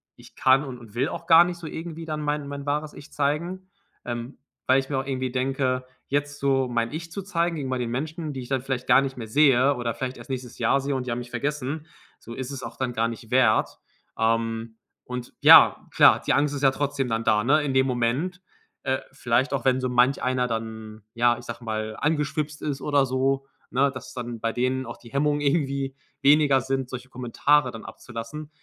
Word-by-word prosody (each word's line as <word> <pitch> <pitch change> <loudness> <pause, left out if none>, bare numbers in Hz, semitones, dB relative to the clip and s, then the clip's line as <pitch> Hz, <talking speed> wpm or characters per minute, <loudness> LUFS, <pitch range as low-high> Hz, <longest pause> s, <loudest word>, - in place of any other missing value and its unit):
ich - - -17
kann 130 +2 +4
und 130 -3 -7
und 115 -3 -14
will 130 +4 +1
auch - - -6
gar 165 +1 +9
nicht 175 0 -4
so 170 - -10
irgendwie 165 +1 -6
dann 155 -1 -3
mein 150 -1 -2
mein 140 0 -6
wahres 150 +1 -2
Ich 145 - -13
zeigen“, 170 +6 -2 0.4
ähm, 120 +2 -5 0.3
weil 130 +1 +5
ich 135 - -5
mir 140 - -1
auch 135 - -4
irgendwie 130 -2 -2
denke: 130 0 -1 0.2
„Jetzt 145 +1 -2
so 135 -2 +2
mein 115 -1 -1
Ich 165 +2 -6
zu 195 +4 -5
zeigen 170 -3 0
gegenüber 130 -4 -3
den 120 -1 -2
Menschen, 155 +5 -4
die 130 - -5
ich 125 - -10
dann 135 -2 0
vielleicht 130 -1 -4
gar 130 +1 +6
nicht 135 -1 -4
mehr 115 -2 -6
sehe 135 +2 +4
oder 120 -2 -2
vielleicht 130 0 -4
erst - - -12
nächstes 125 -2 -6
Jahr 120 +4 +3
sehe 140 +1 -2
und 130 -1 -3
die - - -1
haben 120 - -2
mich 120 0 -9
vergessen, 145 +4 -3 0.3
so 115 - -10
ist 130 0 -5
es 135 -2 -6
auch - - -8
dann 125 -2 -2
gar 115 0 +1
nicht 115 0 -8
wert“, 125 -4 +3 0.4
ähm, 115 0 0 0.3
und 125 -1 -6
ja, - - +8
klar, - - +6
die - - +2
Angst 145 0 +2
ist 140 - -5
ja 135 - +6
trotzdem 140 -1 -2
dann 115 0 -1
da, 105 -1 +3
ne, 150 +5 +4
in 145 -2 -2
dem 130 0 +4
Moment, 130 +9 -1 0.4
äh, 130 -1 0
vielleicht 130 0 0
auch 135 -4 -2
wenn 130 0 +3
so 130 - -1
manch 125 +2 +3
einer 125 -1 +1
dann 110 -1 -5
ja, 120 0 +3
ich - - -11
sage 115 +1 -7
mal 110 0 -3
angeschwipst 150 0 -1
ist 140 -2 -3
oder 145 -1 +2
so, 135 +1 0 0.2
ne, 135 +2 +2
dass 130 -1 -9
dann 120 -2 -5
bei 115 +1 -1
denen 130 +1 0
auch - - -7
die 115 - -15
Hemmungen 145 +1 +1
irgendwie 140 -2 0 0.3
weniger 140 -1 +5
sind, 130 0 -2
solche 130 0 -7
Kommentare 130 +3 +1
dann 115 - -9
abzulassen. 120 +6 -8
130 Hz, 220 wpm, -25 LUFS, 120-145 Hz, 0.4 s, gar